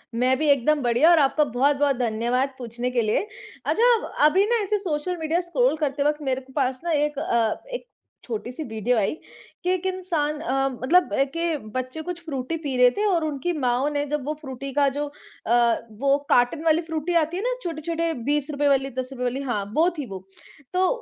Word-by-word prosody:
मैं 255 Hz, +2 st, +2 dB
भी 310 Hz, +1 st, 0 dB
एकदम 285 Hz, +2 st, +3 dB
बढ़िया 245 Hz, +7 st, +4 dB
और 335 Hz, -, +6 dB
आपका 295 Hz, +2 st, +3 dB
बहुत-बहुत 280 Hz, +2 st, +2 dB
धन्यवाद 245 Hz, +3 st, 0 dB
पूछने 240 Hz, 0 st, -4 dB
के 240 Hz, -1 st, +2 dB
लिए। 220 Hz, -, 0 dB, 0.4 s
अच्छा 480 Hz, +2 st, +4 dB, 0.3 s
अभी 380 Hz, +7 st, +4 dB
ना 475 Hz, -, +2 dB
ऐसे 415 Hz, +2 st, 0 dB
सोशल 350 Hz, 0 st, -2 dB
मीडिया 320 Hz, +2 st, 0 dB
स्क्रॉल 295 Hz, -5 st, +1 dB
करते 285 Hz, -2 st, -1 dB
वक़्त 295 Hz, +1 st, 0 dB
मेरे 265 Hz, -1 st, -1 dB
को 265 Hz, 0 st, -18 dB
पास 260 Hz, -3 st, 0 dB
ना 340 Hz, -, -1 dB
एक 295 Hz, -1 st, +1 dB
अ, 230 Hz, -7 st, 0 dB
एक -, -, -5 dB, 0.4 s
छोटी 425 Hz, -, -5 dB
सी 285 Hz, +5 st, -5 dB
वीडियो 225 Hz, +2 st, 0 dB
आई 200 Hz, -3 st, +1 dB, 0.5 s
कि 360 Hz, -, 0 dB
एक 370 Hz, 0 st, -3 dB
इंसान 340 Hz, -6 st, -1 dB
अ, 270 Hz, 0 st, 0 dB
मतलब 345 Hz, +8 st, +3 dB
अ, 270 Hz, -, +3 dB
के 330 Hz, +3 st, -1 dB, 0.2 s
बच्चे 255 Hz, +4 st, -3 dB
कुछ 345 Hz, +1 st, -6 dB
फ्रूटी 285 Hz, +2 st, -3 dB
पी 285 Hz, -5 st, -4 dB
रहे 250 Hz, 0 st, +6 dB
थे 420 Hz, -, +1 dB
और 350 Hz, -5 st, +2 dB
उनकी 310 Hz, +4 st, -2 dB
माओं 255 Hz, +3 st, +1 dB
ने 290 Hz, 0 st, -1 dB
जब 295 Hz, -2 st, -3 dB
वो 300 Hz, -, -1 dB
फ्रूटी 270 Hz, -1 st, -6 dB
का 285 Hz, -1 st, +3 dB
जो 295 Hz, 0 st, -1 dB, 0.4 s
अ, 235 Hz, 0 st, +4 dB, 0.2 s
वो 275 Hz, +1 st, +3 dB
कार्टन 245 Hz, +6 st, +3 dB
वाली 320 Hz, +1 st, +4 dB
फ्रूटी 325 Hz, +1 st, -3 dB
आती 345 Hz, +4 st, -6 dB
है 395 Hz, -, -3 dB
ना -, -, +1 dB
छोटे-छोटे 330 Hz, 0 st, -2 dB, 0.2 s
₹20 290 Hz, 0 st, 0 dB
वाली, 270 Hz, -1 st, +2 dB
₹10 255 Hz, 0 st, -5 dB
वाली 250 Hz, +3 st, -1 dB
हाँ 205 Hz, -3 st, -1 dB
वो 330 Hz, +3 st, +4 dB
थी 290 Hz, -, -3 dB
वो, 190 Hz, -1 st, -8 dB, 0.5 s
तो 370 Hz, 0 st, +3 dB
290 Hz, 205 wpm, -24 LUFS, 255-330 Hz, 0.5 s, और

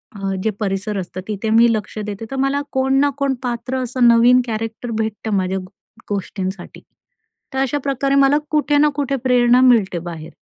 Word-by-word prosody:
अ, -, -, -9 dB, 0.2 s
जे 220 Hz, -, +1 dB
परिसर 200 Hz, 0 st, -2 dB
असतं, 185 Hz, 0 st, -5 dB
तिथे 215 Hz, +1 st, -3 dB
मी 235 Hz, +1 st, +6 dB
लक्ष 215 Hz, 0 st, -4 dB
देते, 210 Hz, +1 st, -6 dB
तर 270 Hz, -, -5 dB
मला 275 Hz, +1 st, 0 dB
कोण 265 Hz, 0 st, 0 dB
ना 285 Hz, 0 st, +3 dB
कोण 275 Hz, -1 st, 0 dB
पात्र 245 Hz, +1 st, -3 dB
असं 250 Hz, 0 st, +2 dB
नवीन 235 Hz, +2 st, +6 dB
कॅरेक्टर 225 Hz, +1 st, -4 dB
भेटतं 220 Hz, 0 st, -3 dB
माझ्या 185 Hz, 0 st, -1 dB
गो 185 Hz, -1 st, -8 dB, 0.4 s
गोष्टींसाठी. 195 Hz, -1 st, -5 dB, 0.7 s
तर 265 Hz, -, -2 dB
अशा 270 Hz, +2 st, 0 dB
प्रकारे 275 Hz, 0 st, 0 dB
मला 275 Hz, +1 st, +4 dB
कुठे 295 Hz, -1 st, +2 dB
ना 300 Hz, +1 st, +4 dB
कुठे 280 Hz, -1 st, -1 dB
प्रेरणा 245 Hz, 0 st, +4 dB
मिळते 220 Hz, -9 st, +3 dB
बाहेर. 165 Hz, -2 st, -8 dB
235 Hz, 180 wpm, -19 LUFS, 205-270 Hz, 0.7 s, मी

